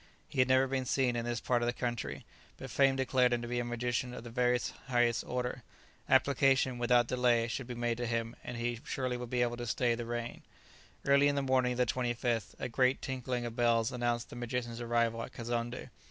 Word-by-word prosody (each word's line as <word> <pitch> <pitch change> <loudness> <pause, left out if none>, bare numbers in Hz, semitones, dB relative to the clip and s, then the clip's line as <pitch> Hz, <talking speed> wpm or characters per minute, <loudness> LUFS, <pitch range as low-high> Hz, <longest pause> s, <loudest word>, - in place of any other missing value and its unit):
He - - -5
had 130 - +5
never 130 0 +5
been 130 -1 -2
seen 125 -1 +1
in 120 0 -2
this 120 0 -2
part 120 0 +1
of 120 - 0
the 120 - +1
country, 115 - -4 0.3
but - - -8
fame 135 -1 +4
declared 130 -1 +2
him 120 0 -1
to - - -4
be 120 0 -1
a - - 0
magician 120 +1 -2
of - - -8
the 120 - -9
very 125 0 +2 0.3
highest 120 -2 +2
order. 125 0 -2 0.5
Application, 135 -2 +3
without 120 0 +4
delay, 120 -2 +2
should 120 +2 -4
be 125 - -5
made 120 -1 -1
to 120 0 -2
him; 115 0 -2
he 120 -1 -3
surely 130 -2 -2
would 120 -1 -6
be 125 0 +2
able 120 0 -1
to 120 0 -5
stay 120 +2 +1
the 115 0 -4
rain. 120 0 -4 0.6
Early 140 +1 +5
in 145 - +1
the 140 - 0
morning 130 -1 +2
of - - -6
the 125 - +3
25th 120 -3 -1
a - - -3
great 130 +2 +2
tinkling 125 -2 -3
of 115 -1 -5
bells 115 -2 +2
announced 120 -1 -1
the - - -8
magician's 120 -1 -3
arrival 115 -1 +1
at - - -7
Kazonndé. 120 +1 -4
120 Hz, 220 wpm, -32 LUFS, 120-125 Hz, 0.6 s, had